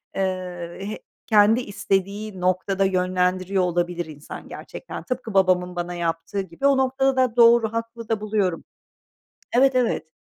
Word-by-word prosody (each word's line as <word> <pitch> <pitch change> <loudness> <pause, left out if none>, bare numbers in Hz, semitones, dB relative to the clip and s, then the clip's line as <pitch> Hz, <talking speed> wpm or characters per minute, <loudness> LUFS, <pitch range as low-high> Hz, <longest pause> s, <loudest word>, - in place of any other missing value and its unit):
eee, 180 -2 -3
he 210 +2 -5 0.3
kendi 215 +2 +5
istediği 200 -1 -2
noktada 185 +2 +1
yönlendiriyor 185 0 +1
olabilir 175 -1 -1
insan 150 -2 -10
gerçekten. - - -8
Tıpkı 255 -4 -4
babamın 180 -2 +2
bana 175 0 -3
yaptığı 170 +3 -2
gibi, 190 +9 -2
o 275 -1 +4
noktada 265 +1 +2
da, 255 -3 +2
doğru 235 -2 +5
haklı 230 0 -5
da 220 -2 0
buluyorum. 205 -5 -1 0.9
Evet, 265 +1 +5
evet, 245 -9 +1
195 Hz, 135 wpm, -23 LUFS, 180-230 Hz, 0.9 s, kendi